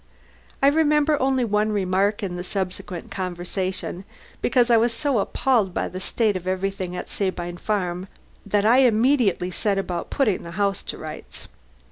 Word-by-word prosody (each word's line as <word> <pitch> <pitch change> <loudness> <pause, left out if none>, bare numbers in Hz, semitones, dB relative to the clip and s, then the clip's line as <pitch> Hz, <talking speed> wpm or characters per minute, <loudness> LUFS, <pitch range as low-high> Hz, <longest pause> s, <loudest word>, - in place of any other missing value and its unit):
I - - +7
remember 300 -1 +3
only 260 -1 +2
one 210 0 +1
remark 200 +1 +1
in 180 -3 -3
the 180 - -4
subsequent 185 -2 -4
conversation, 185 0 -3 0.4
because 245 -1 +3
I 230 - +7
was 230 +1 +2
so 270 0 +1
appalled 210 -3 +1
by - - 0
the 185 - -6
state 215 +2 0
of 185 0 -5
everything 185 -1 -2
at - - -5
Sabine 175 -3 -3
Farm 185 -2 -2 0.4
that 205 0 +1
I 235 +3 +6
immediately 230 -6 +3
set 200 +2 0
about 180 -3 -3
putting 220 -9 +1
the 170 - -8
house 200 -2 +1
to - - -6
rights. - - -9
200 Hz, 160 wpm, -23 LUFS, 185-235 Hz, 0.4 s, I